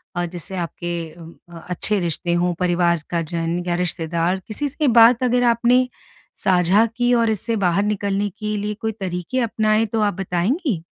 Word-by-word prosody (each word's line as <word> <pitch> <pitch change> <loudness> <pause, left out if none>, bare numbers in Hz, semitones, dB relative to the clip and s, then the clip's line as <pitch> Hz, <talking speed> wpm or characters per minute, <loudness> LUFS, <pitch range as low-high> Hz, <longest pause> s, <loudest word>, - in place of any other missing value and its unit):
अ, 175 0 -1
जिससे 175 +1 -7
आपके 175 0 -4 0.3
अ, 170 +1 -13
अच्छे 200 +3 0
रिश्ते 170 0 -1
हों 175 +1 +1
परिवार 175 -2 +1
का 170 -1 0
जन 165 +2 -2
या 175 - +1
रिश्तेदार 170 +1 -1
किसी 285 +7 -3
से 290 +1 -1
बात 235 +1 +6
अगर 245 0 +2
आपने 245 +2 +3 0.5
साझा 185 +4 +3
की 245 +1 +2
और 230 -1 +3
इससे 220 +2 -1
बाहर 195 -1 +1
निकलने 205 -1 -1
के 215 -1 -2
लिए 210 +1 -2
कोई 220 - -1
तरीके 180 +6 -3
अपनाएँ 220 -1 +1
तो 225 +1 -2
आप 205 -1 +1
बताएँगी? 190 - -1
195 Hz, 170 wpm, -21 LUFS, 175-225 Hz, 0.5 s, बात